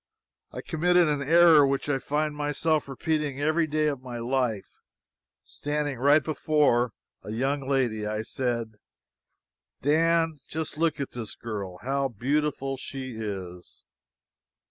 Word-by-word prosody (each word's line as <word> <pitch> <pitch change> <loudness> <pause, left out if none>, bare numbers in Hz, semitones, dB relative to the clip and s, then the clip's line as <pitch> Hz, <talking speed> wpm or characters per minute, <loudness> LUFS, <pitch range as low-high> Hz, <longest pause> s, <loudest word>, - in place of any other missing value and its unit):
I - - -6
committed 175 +2 +3
an 145 -2 0
error 165 +1 +6
which 135 0 0
I 140 -2 +1
find 150 +3 -1
myself 150 +1 0
repeating 150 0 -2
every 155 +2 +2
day 155 0 0
of 140 -4 -1
my 125 -2 -7
life. 120 -3 -1 0.7
Standing 145 -3 -3
right 145 +3 +5
before 145 -7 +2 0.3
a - - -10
young 135 +4 -1
lady, 120 -6 0
I 110 +1 -2
said: 115 -3 -3 1.0
"Dan, 165 +1 +2
just 160 -1 -4
look 160 -2 +1
at 140 - -3
this 115 -3 -6
girl, 100 -5 -6
how 135 +1 0
beautiful 135 +3 -1
she 130 -1 -6
is!" 95 -5 -7
140 Hz, 130 wpm, -27 LUFS, 120-150 Hz, 1.0 s, error